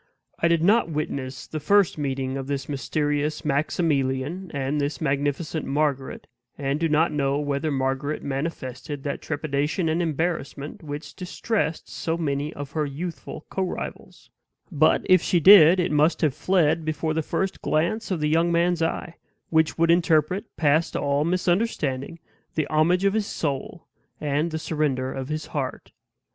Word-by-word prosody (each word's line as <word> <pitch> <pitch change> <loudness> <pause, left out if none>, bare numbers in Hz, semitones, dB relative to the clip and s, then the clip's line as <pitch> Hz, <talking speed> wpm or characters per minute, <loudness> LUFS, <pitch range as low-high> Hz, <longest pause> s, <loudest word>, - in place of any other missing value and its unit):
I 170 - +3
did 170 -1 +2
not 210 0 +4
witness 140 -4 -4
the 155 - -5
first 200 +4 +3
meeting 135 -2 -2
of 135 -1 -4
this 140 -2 -3
mysterious 150 +1 -1
Maximilian 145 +2 0
and 140 +1 -1
this 145 +2 -2
magnificent 145 +2 -1
Margaret, 140 -2 -1 0.3
and 140 0 -1
do 165 0 +1
not 155 +2 +3
know 140 -2 0
whether 145 +1 -1
Margaret 135 +1 -1
manifested 135 -1 -4
that 140 - -3
trepidation 150 +3 -1
and 160 +2 +1
embarrassment 160 +1 -3
which 150 -1 -7
distressed 185 -1 -2
so 165 0 -3
many 145 -2 -1
of 145 0 -7
her 155 +1 -1
youthful 160 +2 -6
co 190 - -2
rivals; 185 - -6 0.4
but, 155 -1 +3
if 185 -2 +5
she 175 - +2
did, 185 -1 +8
it 175 -2 +1
must 150 +3 +3
have 150 -4 +2
fled 170 -2 +2
before 155 0 -1
the 160 - 0
first 190 +5 -2
glance 170 +10 0
of 180 -5 -1
the 150 - +2
young 165 +3 +2
man's 170 0 +2
eye, 165 +1 -2 0.3
which 160 -1 +2
would 165 0 +4
interpret, 170 +3 +2
past 155 +1 +2
all 140 0 +1
misunderstanding, 170 - 0 0.4
the 155 - +1
homage 170 +5 +3
of 195 - +3
his 215 -2 0
soul 145 +3 -4 0.3
and 150 +3 0
the 160 - -3
surrender 145 -5 -1
of 135 +1 -5
his 155 0 -3
heart. 135 -4 -4
155 Hz, 155 wpm, -24 LUFS, 140-170 Hz, 0.4 s, did